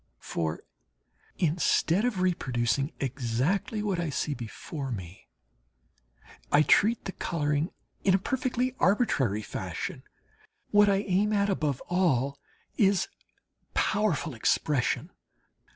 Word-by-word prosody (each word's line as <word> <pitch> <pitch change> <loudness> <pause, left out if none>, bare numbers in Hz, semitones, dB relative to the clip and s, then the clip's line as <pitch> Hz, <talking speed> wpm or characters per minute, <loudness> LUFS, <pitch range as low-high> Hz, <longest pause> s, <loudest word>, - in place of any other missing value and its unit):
For, 80 -1 -3 0.7
instead 170 +4 +2
of 215 -7 0
reproducing 135 -6 0
exactly 140 - -1
what 195 -4 0
I 170 -2 -1
see 145 +1 -1
before 135 +3 -6
me, 95 -5 -7 1.2
I 145 +1 +6
treat 215 - +3
the 190 - -3
colouring 150 -2 -1 0.3
in 190 -1 +5
a - - +5
perfectly 255 +3 -1
arbitrary 135 - +2
fashion. - - -5 0.7
What 205 0 +6
I 195 0 +2
aim 200 +2 +2
at 200 -1 +2
above 150 -8 -1
all 140 -7 +1 0.4
is 195 -3 +3 0.7
powerful 200 -7 +1
expression. 125 +3 0
170 Hz, 105 wpm, -28 LUFS, 135-200 Hz, 1.2 s, I